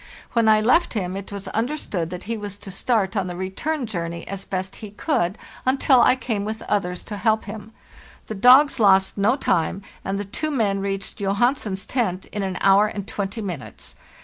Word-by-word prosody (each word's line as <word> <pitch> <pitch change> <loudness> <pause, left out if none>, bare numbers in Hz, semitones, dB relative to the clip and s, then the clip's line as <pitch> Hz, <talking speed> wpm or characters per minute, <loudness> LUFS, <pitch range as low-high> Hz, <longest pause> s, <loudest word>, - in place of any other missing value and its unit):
When 230 -2 +4
I 215 0 +5
left 255 +7 +3
him 185 -3 -2
it 195 +1 -7
was 200 -1 -6
understood 220 - -2
that 180 +1 -7
he 230 +2 -3
was 205 -2 -6
to 205 -1 -9
start 215 0 0
on 195 -3 0
the 175 - -5
return 215 - -3
journey 170 -5 -4
as 195 -1 -5
best 190 0 -4
he 215 - -8
could, 200 - -1 0.3
until 260 -1 +4
I 245 - +5
came 230 -5 -2
with 220 +1 -4
others 180 -4 -1
to 210 - -6
help 220 +1 +1
him. 215 +1 -8 0.5
The - - -5
dogs 255 +6 +6
lost 190 -3 +4
no 210 +5 +3
time, 190 - 0 0.2
and 195 +1 -2
the 205 - -3
two 310 +10 -3
men 215 -9 +1
reached 195 0 -3
Johansen's 200 0 0
tent 195 -8 -1
in 210 - -3
an 190 -2 -2
hour 200 +2 +5
and 200 -2 -6
twenty 205 +1 -4
minutes. 175 -10 -7
205 Hz, 195 wpm, -23 LUFS, 190-230 Hz, 0.5 s, dogs